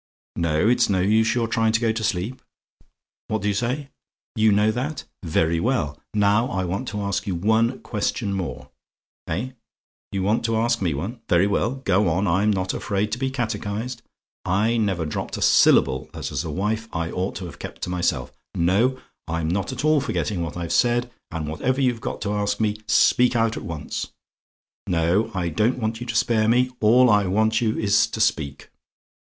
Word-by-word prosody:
Now, 85 -2 0
it's 115 +8 +3
no 95 -2 +2
use 110 +5 +3
your 115 -2 +1
trying 110 -1 +1
to 110 - +3
go 115 -1 +1
to 110 0 -3
sleep. 105 +4 -2 0.9
What 110 -2 -2
do - - 0
you 100 - +2
say? 125 +7 -2 0.5
"YOU 110 -1 +4
KNOW 105 +2 +3
THAT? 130 +6 -3 0.2
"Very 80 -1 +1
well. 80 - -1
Now 105 +3 +3
I 95 -5 -1
want 100 +9 -3
to 105 -1 -3
ask 100 +1 -2
you 95 - -1
one 110 +7 +2
question 105 -1 -2
more. 85 -9 -5 0.6
Eh? 105 +11 -3 0.6
"YOU 95 -1 -2
WANT 105 +4 +1
TO 115 -1 0
ASK 115 0 +1
ME 85 -6 0
ONE? 105 - -5
"Very 85 +2 +4
well 105 +5 0
go 100 -7 +1
on 90 +5 +1
I'm 95 +4 +2
not 95 -3 0
afraid 105 +1 -1
to 120 - -2
be 135 0 0
catechised. 115 -1 -3 0.4
I 105 +6 +1
never 100 -7 0
dropped 75 - -4
a - - -6
syllable 65 -1 +4
that - - -5
as - - -2
a 80 - -5
wife 105 +7 -2
I 85 0 -3
ought 95 +2 -2
to 95 - -5
have 85 - -10
kept - - -8
to 90 - -2
myself 90 -1 -1 0.2
no, 105 +10 +2 0.3
I'm 80 0 -2
not 100 +5 -1
at 130 +3 -4
all 155 -2 +4
forgetting 105 -8 -2
what 80 0 -4
I've 85 -1 -3
said 120 0 +2 0.2
and 80 -2 -4
whatever 125 - -1
you've 125 -4 +1
got 125 -1 -5
to 105 0 -1
ask 105 0 -1
me 105 -1 0
speak 125 +3 +4
out 115 -1 +2
at - - -5
once. 80 -3 -5 0.8
No 85 +6 +1
I 90 -2 -1
don't 110 +10 +1
want 110 -1 -2
you 120 - -5
to 115 - -3
spare 110 -1 +2
me; 125 +2 +3
all 120 +4 +5
I 105 -4 +4
want 110 +4 +2
you 110 -2 0
is 100 -1 +3
to - - -6
speak. 80 -11 -1
105 Hz, 195 wpm, -23 LUFS, 90-115 Hz, 0.9 s, all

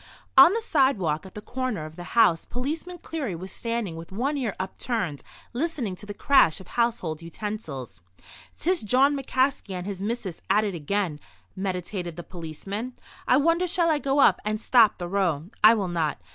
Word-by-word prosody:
On 270 +6 +9
the 460 - 0
sidewalk 210 - +1
at 185 - -16
the 210 - -7
corner 250 -11 -3
of 155 0 -10
the 175 - -8
house 170 -8 +5
Policeman 310 +8 -4
Cleary 290 - -4
was 185 +3 -7
standing 230 -7 -3
with 165 +1 -9
one 260 +9 -1
ear 245 -8 -2
upturned, 190 - -3 0.3
listening 255 - -2
to 205 - -12
the 205 - -5
crash 270 - +4
of 190 - -13
household 230 -10 -1
utensils. 165 - -6 0.6
"'Tis 360 +2 +1
Jawn 265 +6 +3
McCaskey 260 -6 0
and 180 0 -5
his 195 -2 -5
missis 205 -4 -4
at 210 +2 +4
it 205 -2 -2
again," 170 0 -2 0.4
meditated 180 -2 -4
the 175 - -7
policeman. 195 +9 -6 0.3
"I 255 - +5
wonder 335 +5 +2
shall 345 -2 +2
I 300 - +2
go 275 0 0
up - - +5
and 215 0 -1
stop 230 -2 +5
the 175 - -4
row. 175 -6 0 0.2
I 220 +2 +9
will 200 -4 -1
not. 165 -4 -1
210 Hz, 180 wpm, -26 LUFS, 175-260 Hz, 0.6 s, On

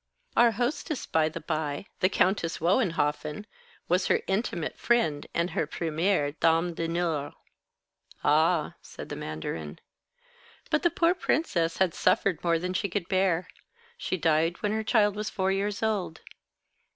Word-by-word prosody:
Our 235 -1 +5
hostess, 250 +5 -2
by 160 -1 +2
the 155 - -7
by, 155 0 -3
the 185 - +3
Countess 185 -3 +1
Wohenhoffen, 165 - 0 0.4
was 180 +2 +2
her - - +2
intimate 190 -5 -2
friend 195 -12 +1
and 170 +2 -1
her 155 - -1
première 160 -1 0
dame 165 +1 +3
d'honneur." 165 -3 -2 0.9
"Ah," 155 +2 +3
said - - -10
the - - -4
mandarin. 80 0 -5 0.9
"But 310 - +3
the 345 - +3
poor 335 +2 +2
princess 175 - 0
had 185 -3 +2
suffered 185 -1 +1
more 170 -1 +3
than 180 +2 -3
she 200 +2 -1
could 180 -2 -3
bear. 185 -2 +1 0.5
She 185 - -3
died 165 +1 +1
when 205 - +1
her 220 0 -1
child 210 -2 +3
was 210 0 -3
four 190 0 0
years 200 +2 -1
old. 200 -7 -1
175 Hz, 145 wpm, -28 LUFS, 160-205 Hz, 0.9 s, Our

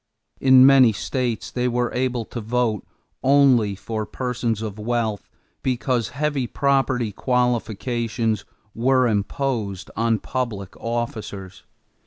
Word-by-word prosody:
In 130 -1 +7
many 135 -4 +7
states 120 0 -3
they 125 0 -1
were 120 0 -1
able 125 -2 -1
to 120 - -6
vote 115 -1 0 0.4
only 130 -7 +4
for 110 +2 -4
persons 120 -2 -2
of 105 -1 -6
wealth 110 -2 -2 0.3
because 125 -2 0
heavy 140 -2 -1
property 130 -4 +1
qualifications 115 -2 -1 0.3
were 130 +2 +3
imposed 105 -3 -2
on 115 +1 +1
public 105 -6 -4
officers. 110 -5 -5
120 Hz, 110 wpm, -22 LUFS, 110-130 Hz, 0.4 s, In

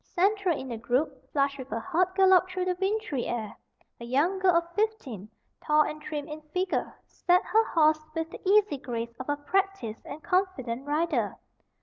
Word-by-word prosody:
Central 390 -2 +2
in 265 - -6
the 235 - -4
group, 265 +3 -1
flushed 280 -1 +1
with 260 0 -7
her 230 - -2
hard 360 +7 +1
gallop 375 -1 +5
through 370 0 -2
the 365 0 0
wintry 390 - -1
air, 220 -3 -3 0.4
a - - -8
young 290 +11 +1
girl 370 -2 +4
of 340 0 0
fifteen, 325 - -2 0.3
tall 305 0 +4
and 305 0 -5
trim 295 -1 -5
in 305 0 -7
figure, 365 0 0
sat 360 +1 +2
her 445 +1 +4
horse 310 -2 +4 0.2
with 325 0 -1
the - - -9
easy 395 -5 +4
grace 235 -2 -5
of 255 - -6
a 290 - +1
practised 365 - -1
and 295 +2 -8
confident 290 -10 -1
rider. 295 -7 0
310 Hz, 185 wpm, -28 LUFS, 265-370 Hz, 0.4 s, gallop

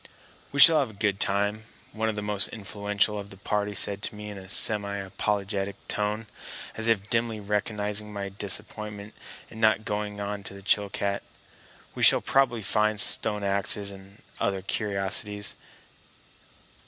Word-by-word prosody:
"We 140 - -3
shall 160 +1 +9
have 135 -5 0
a - - -12
good 100 -1 -1
time," 105 +2 +1 0.3
one 110 0 -1
of 110 - -3
the 105 - -4
most 105 -1 +2
influential 105 0 -2
of 100 0 -8
the 95 - -11
party 105 +1 -2
said 100 0 +3
to 105 - -2
me 105 0 -7
in 100 - -9
a 95 -1 -12
semi 100 -1 +2
apologetic 100 0 -2
tone, 105 +1 -1 0.5
as 110 0 0
if 105 -3 +2
dimly 115 -1 0
recognizing 105 0 -1
my 100 -1 -5
disappointment 105 +1 -2 0.4
in 110 - -10
not 110 -1 +3
going 105 -1 -3
on 100 0 -4
to 100 +1 -6
Chilcat. 100 0 0 0.7
"We - - -7
shall - - +7
probably 125 -5 +1
find 105 +1 +1
stone 105 -1 +3
axes 100 0 0
and 100 +1 -14 0.2
other 95 -1 -1
curiosities. 100 0 0
105 Hz, 155 wpm, -26 LUFS, 100-105 Hz, 0.7 s, shall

